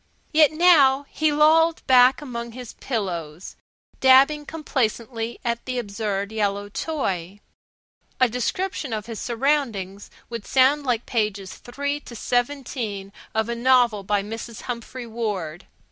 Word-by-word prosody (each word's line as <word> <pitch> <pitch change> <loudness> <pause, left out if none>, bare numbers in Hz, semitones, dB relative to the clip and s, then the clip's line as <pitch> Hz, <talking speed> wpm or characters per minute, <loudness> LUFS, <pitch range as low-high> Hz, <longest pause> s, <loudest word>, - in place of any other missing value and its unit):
Yet 305 -1 +6
now 300 -5 +5
he 310 -1 +1
lolled 320 +2 +4
back 255 +2 +5
among 235 -3 -6
his 250 -1 -9
pillows, 175 - -4 0.4
dabbling 275 +3 +5
complacently 235 -6 -2
at 235 0 -1
the 255 -1 -3
absurd 200 -2 -3
yellow 205 -2 -1
toy. 195 - -3 0.8
A 255 - +5
description 260 - -3
of 215 -1 -3
his 230 -2 -7
surroundings 230 -7 -1 0.2
would 235 -3 -7
sound 275 +2 +3
like 240 -2 0
Pages 210 -5 -2
3 285 +4 -4
to 245 - -12
17 240 -5 -2 0.2
of 220 0 +1
a 235 - -2
novel 240 -3 +3
by 200 +1 0
Mrs. 225 +1 -7
Humphry 245 +1 -6
Ward. 205 -8 -4
235 Hz, 130 wpm, -23 LUFS, 210-270 Hz, 0.8 s, Yet